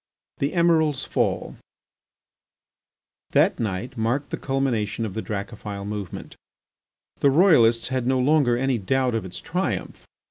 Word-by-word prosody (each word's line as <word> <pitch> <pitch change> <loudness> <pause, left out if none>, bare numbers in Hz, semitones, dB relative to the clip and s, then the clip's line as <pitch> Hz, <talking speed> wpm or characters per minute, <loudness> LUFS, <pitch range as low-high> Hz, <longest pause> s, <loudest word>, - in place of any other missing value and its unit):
THE 140 +2 -1
EMIRAL'S 160 -5 +2
FALL - - -1 1.8
That - - +3
night 110 +3 -3
marked 120 +5 -1
the - - -2
culmination 120 -5 -1
of 105 - -5
the 110 - -3
Dracophil 100 -1 -6
movement. 105 -3 -6 0.8
The 140 - +4
Royalists 130 - +4
had 130 -2 -1
no 130 0 +2
longer 130 -2 +3
any 130 -1 0
doubt 125 +5 0
of 115 -3 -2
its 90 - -7
triumph. 180 +4 -3
125 Hz, 130 wpm, -24 LUFS, 110-140 Hz, 1.8 s, The